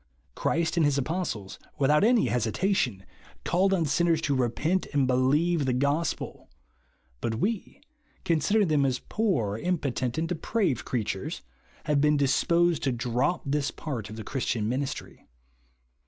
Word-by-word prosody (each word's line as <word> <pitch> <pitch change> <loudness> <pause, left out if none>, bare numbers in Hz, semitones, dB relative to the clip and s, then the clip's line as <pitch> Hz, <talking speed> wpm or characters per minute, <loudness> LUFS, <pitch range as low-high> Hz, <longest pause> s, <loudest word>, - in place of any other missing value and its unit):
Christ 170 +2 0
and 165 - +4
his 145 -2 +2
apostles, 140 - -3 0.2
without 150 +4 +3
any 235 +1 +4
hesitation, 125 - 0 0.4
called 190 +3 +2
on 180 -4 +2
sinners 165 +3 +2
to 145 -3 0
repent 135 +9 0
and 140 -2 +3
believe 140 +5 +2
the 130 - +2
gospel; 140 +5 -1 0.7
but 115 -1 -2
we, 205 - -2 0.5
considering 195 +6 +2
them 150 -2 +3
as 130 -2 +1
poor, 125 - -1
im 180 +4 0
potent, 130 -3 -2
and 165 +1 0
depraved 180 - -1
creatures, 115 - -3 0.4
have 150 -3 +1
been 150 0 +4
disposed 170 +5 +2
to 135 - +1
drop 125 +7 0
this 140 0 0
part 120 -10 -5
of 110 - -8
the 110 - -6
Christian 120 -4 -2
ministry. 130 +4 -4
145 Hz, 140 wpm, -27 LUFS, 125-170 Hz, 0.7 s, and